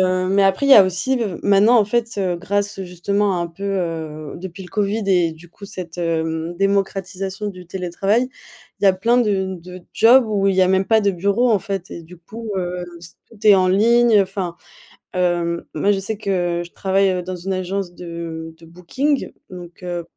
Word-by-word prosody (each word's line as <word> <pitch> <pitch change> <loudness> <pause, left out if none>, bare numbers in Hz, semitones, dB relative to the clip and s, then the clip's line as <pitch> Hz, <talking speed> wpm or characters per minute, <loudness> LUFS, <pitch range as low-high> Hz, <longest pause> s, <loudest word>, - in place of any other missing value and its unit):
heu, 185 0 +1
mais 195 +1 +3
après 195 +8 +2
il - - +3
y - - +11
a 205 - +10
aussi 195 +9 0
le 235 - -1
v - - -13
maintenant, 205 +4 +5
en 210 - +4
fait, 235 +2 0
heu, 185 -3 0
grâce 200 +2 -2
justement 190 +2 -1
un 170 - -1
peu, 195 +4 -9
heu, 160 -6 -3
depuis 185 +1 -8
le 180 - -11
Covid 210 +1 -1
et 175 -4 +3
du 165 +2 -15
coup 200 +3 -12
cette, 175 -3 -8
hem, 165 0 -2
démocratisation 195 0 -1
du 180 -3 -10
télétravail, 195 +7 -1 0.5
il - - -1
y - - +6
a 195 - +7
plein 230 +6 +2
de 190 -5 0
de 180 +1 -10
jobs 240 +3 +6
où 200 -2 0
il 195 - +2
y 190 - +5
a 185 - +3
même 190 0 +2
pas 220 +3 +4
de 200 - +3
bureau, 200 +7 +1
en 215 - +4
fait. 195 -1 -5
Et 170 - -8
du 175 +2 -14
coup, 220 +6 -9
heu, 180 -1 -2 0.2
s 170 0 -13
tout 215 -1 -7
est 205 - +9
en 185 -1 +3
ligne 225 +2 +4
enfin, 190 -3 -4 0.6
hem, 175 -2 0
moi 200 +7 +1
je 195 - -1
sais 210 +2 -4
que 175 -4 -1
je 175 - -14
travaille 190 -1 +1
dans 185 0 -5
une 190 +3 -3
agence 185 0 -3
de 170 -2 -7
de 165 - -15
booking 260 - -2 0.2
donc, 180 -1 -11
heu, 175 -1 -4
190 Hz, 210 wpm, -20 LUFS, 175-200 Hz, 0.6 s, y